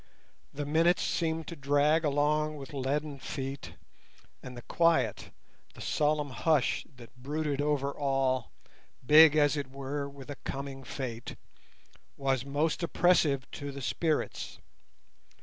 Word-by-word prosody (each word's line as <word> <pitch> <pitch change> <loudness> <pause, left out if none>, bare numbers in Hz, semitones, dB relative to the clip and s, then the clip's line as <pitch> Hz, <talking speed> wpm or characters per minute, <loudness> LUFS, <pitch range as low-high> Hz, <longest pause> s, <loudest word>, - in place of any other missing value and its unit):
The 145 +1 -4
minutes 165 +4 +3
seemed 160 -1 -1
to 170 - -6
drag 145 +2 +2
along 150 +1 +1
with 135 0 -9
leaden 140 +1 -2
feet, 135 0 -5 0.7
and 125 -1 -9
the 120 - -9
quiet, 165 -1 +1 0.5
the - - -14
solemn 150 -1 0
hush, 150 +1 +1
that 120 0 -14
brooded 145 +1 -2
over 145 -1 0
all—big, 135 +2 +2
as 145 -1 +4
it 140 -3 -4
were, 140 +1 -4
with 140 0 -10
a 145 - -7
coming 135 -1 -6
fate, 120 -3 -6 0.8
was 135 -3 0
most 145 +5 -1
oppressive 165 -6 +3
to 145 0 -6
the 140 -1 -7
spirits. 150 - -1
145 Hz, 125 wpm, -30 LUFS, 135-155 Hz, 0.8 s, as